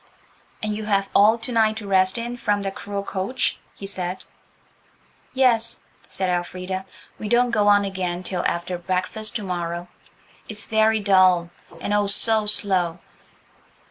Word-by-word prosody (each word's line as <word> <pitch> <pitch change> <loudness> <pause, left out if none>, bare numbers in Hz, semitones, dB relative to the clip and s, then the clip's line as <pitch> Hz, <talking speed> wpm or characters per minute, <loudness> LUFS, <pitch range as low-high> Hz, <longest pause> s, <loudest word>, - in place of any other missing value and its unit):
"And 215 -1 -1
you 215 0 -5
have 200 -2 +1
all 215 +3 +6
to 230 +2 -6
night 220 -2 +3
to 210 -2 -7
rest 190 +1 +3
in 240 +1 -3
from 205 -4 0
that 195 0 -3
cruel 200 0 -5
coach?" 200 +7 -2 0.2
he 200 - -8
said. 185 -2 -4 1.1
"Yes," 235 -3 +2 0.3
said 190 - -2
Elfrida, 185 +1 -3 0.3
"we 210 - -4
don't 245 +1 +3
go 210 -3 +2
on 205 0 +5
again 185 -2 -3
till 180 -1 -2
after 175 +1 -2
breakfast 185 +4 -2
to 215 - -2
morrow. 175 -1 -3 0.6
It's 210 -1 -5
very 220 0 +3
dull–and 185 -1 +2
oh, 205 -1 +2
so 215 +1 +2
slow! 185 -5 +1
200 Hz, 145 wpm, -23 LUFS, 185-220 Hz, 1.1 s, all